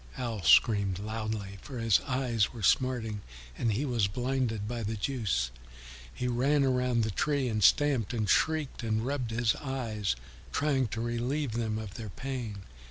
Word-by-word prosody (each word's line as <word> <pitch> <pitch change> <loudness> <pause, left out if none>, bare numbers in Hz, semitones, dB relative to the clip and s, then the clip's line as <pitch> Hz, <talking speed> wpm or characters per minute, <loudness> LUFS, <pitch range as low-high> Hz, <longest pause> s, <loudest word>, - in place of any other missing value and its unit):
Owl 115 -5 -3
screamed 100 +2 +5
loudly, 110 -1 -4
for 135 -4 -8
his 115 -3 +4
eyes 125 -5 +1
were 115 -4 -8
smarting 115 -2 +2 0.3
and 115 - 0
he 120 +8 0
was 120 -7 +1
blinded 120 -1 -1
by 120 +1 -3
the 110 +1 -2
juice; 100 - -1 0.6
he 125 - -3
ran 135 +4 +2
around 125 -3 +2
the 110 - -1
tree 140 +4 0
and 110 -3 0
stamped 135 -3 +4
and 110 -4 -1
shrieked 155 0 +1
and 110 -1 -1
rubbed 130 -3 -2
his 115 0 +1
eyes, 115 - -2 0.4
trying 140 -4 +1
to 115 +1 -4
relieve 120 +4 -1
them 110 -1 -1
of 110 -3 -6
their 110 -2 -7
pain. 120 -4 -5
115 Hz, 165 wpm, -30 LUFS, 110-130 Hz, 0.6 s, screamed